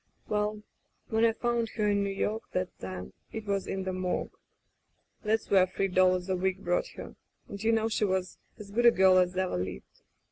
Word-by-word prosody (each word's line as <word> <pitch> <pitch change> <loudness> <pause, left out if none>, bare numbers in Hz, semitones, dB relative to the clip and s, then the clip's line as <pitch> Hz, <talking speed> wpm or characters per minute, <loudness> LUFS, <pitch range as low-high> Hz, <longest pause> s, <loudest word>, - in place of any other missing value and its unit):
*'WeIl, 210 0 0 0.5
when 220 +1 +2
I 230 - +6
found 235 0 -1
her 210 -2 +1
in 200 -1 +2
New 200 - -1
York, 210 +3 -1
that 185 0 -2
time, 95 -1 -7 0.2
it 220 -1 -6
was 200 -2 -1
in 190 0 -2
the 185 0 -3
morgue.... 185 -1 -2 0.9
That's 220 0 -1
where 190 -2 +6
three 195 +1 -1
dollars 185 0 +3
a 190 - +1
week 190 +1 -1
brought - - +1
her, - - -8 0.3
and 200 +1 -7
you 225 - +3
know 225 -1 +2
she 215 -1 +1
was 190 -1 -2 0.2
as 205 -3 -10
good 240 +3 +4
a - - +12
girl 190 -3 +5
as 180 0 +1
ever 185 - 0
lived. 90 -8 -6
195 Hz, 205 wpm, -29 LUFS, 185-220 Hz, 0.9 s, a